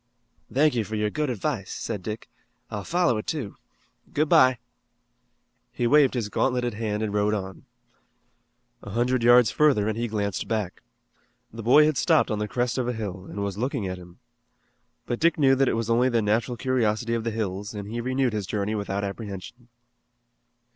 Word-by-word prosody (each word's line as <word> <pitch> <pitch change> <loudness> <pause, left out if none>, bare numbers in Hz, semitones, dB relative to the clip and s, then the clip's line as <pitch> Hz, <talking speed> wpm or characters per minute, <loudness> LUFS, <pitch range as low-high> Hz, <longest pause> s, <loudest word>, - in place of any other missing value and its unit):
"Thank 150 +3 +3
you 115 -2 0
for 110 +1 -5
your 105 0 0
good 150 -2 -1
advice," 120 -3 -3
said 100 - -4
Dick. 105 +4 -6 0.4
"I'll 105 -2 -4
follow 170 -10 +1
it, - - -8
too. 135 -11 -4 0.5
Good 155 +2 +1
bye." 130 -1 +6 1.1
He 120 - -2
waved 135 +1 +4
his 115 -4 -1
gauntleted 125 +2 0
hand 105 0 -2
and 105 -2 -2
rode 105 +1 +2
on. 95 -3 -6 1.2
A - - -9
hundred 120 +4 +1
yards 120 -1 +6
further 140 -9 +3
and 110 - -1
he 120 +1 -2
glanced 100 -3 -2
back. 105 -5 -3 0.7
The 115 - -7
boy 130 +7 +6
had 155 -3 +1
stopped 160 -7 +3
on 105 - -1
the 105 - -2
crest 125 +3 -1
of 125 - -1
a 125 - 0
hill, 95 -5 -6
and 100 - -4
was 100 0 -4
looking 120 -4 -1
at 90 0 -5
him. 90 0 -14 0.9
But 120 - -3
Dick 170 0 +3
knew 135 -3 +5
that 135 0 +3
it - - 0
was 115 -1 -2
only 120 +2 +3
the 115 -3 +1
natural 115 +4 0
curiosity 115 -2 0
of 115 -1 -1
the 115 - -1
hills 105 -2 -4
and 100 -1 -6
he 115 +3 -4
renewed 130 0 0
his 105 -3 -3
journey 105 +1 -2
without 100 -1 -2
apprehension. 100 +3 -7
115 Hz, 190 wpm, -25 LUFS, 105-125 Hz, 1.2 s, bye